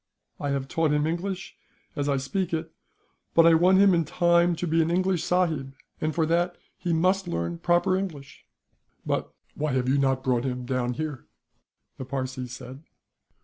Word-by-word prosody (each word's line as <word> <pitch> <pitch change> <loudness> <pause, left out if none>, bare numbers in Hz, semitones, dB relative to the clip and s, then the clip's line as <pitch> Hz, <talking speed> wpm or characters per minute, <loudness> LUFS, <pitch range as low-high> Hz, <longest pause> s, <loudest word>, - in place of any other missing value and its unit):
I 145 - -2
have 135 -1 -1
taught 165 +2 +1
him 150 0 +2
English, 180 +4 -3 0.4
as 145 0 -1
I 140 - +2
speak 170 +7 -2
it; 160 0 -5 0.6
but 165 - +7
I 165 - +7
want 180 +3 +5
him, 195 -1 +6
in 170 -1 +3
time, 170 +2 +3
to 170 - -3
be 165 0 +2
an 160 - +1
English 180 -1 +1
sahib, 160 -7 0 0.3
and 155 -1 -1
for 165 -2 +2
that 175 +2 0 0.2
he 175 - -3
must 185 +3 +2
learn 85 - -3
proper 175 +2 +2
English." 165 -8 -5 0.6
"But - - -2 0.2
why 150 -2 -2
have 130 -1 0
you 140 +2 +3
not 135 -1 +1
brought 125 -2 +1
him 125 -2 -3
down 125 -1 -1
here?" 150 -4 -5 0.7
the 130 - -5
Parsee 130 -1 -4
said. 130 +2 -9
155 Hz, 180 wpm, -26 LUFS, 135-175 Hz, 0.7 s, but